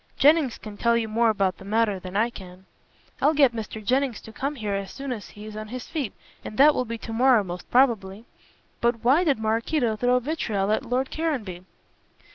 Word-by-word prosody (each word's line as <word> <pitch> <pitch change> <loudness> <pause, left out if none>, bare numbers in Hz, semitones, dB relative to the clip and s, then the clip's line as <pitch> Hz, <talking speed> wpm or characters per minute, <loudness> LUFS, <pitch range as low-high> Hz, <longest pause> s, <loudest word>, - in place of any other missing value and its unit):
Jennings 290 -3 +4
can 210 -2 -10
tell 235 +1 +2
you 225 -1 -1
more 230 +2 +2
about 195 -3 0
the - - -11
matter 210 -1 +1
than 185 +1 -5
I 230 +3 +2
can." 185 -3 -12 0.6
"I'll 310 - +3
get 275 -5 +5
Mr. 220 -1 -6
Jennings 260 +1 +1
to 220 - -12
come 280 +5 -3
here 215 -5 -3
as 195 -1 -3
soon 275 -1 -6
as 220 -5 -6
he 210 0 -11
is 215 -1 -9
on 215 0 -6
his 250 +3 -7
feet, 285 - -3 0.3
and 215 - -8
that 295 +3 +7
will 255 - -1
be 230 0 -5
to 225 0 -7
morrow 245 -2 +4
most 180 -1 -8
probably. 225 -5 +2 0.5
But 235 -1 0
why 275 +9 +4
did 290 -6 +2
Maraquito 225 +3 0
throw 245 +3 +3
vitriol 230 -8 -1
at 215 - +1
Lord 255 +2 -1
Caranby?" 225 - -3
230 Hz, 210 wpm, -25 LUFS, 210-260 Hz, 0.6 s, that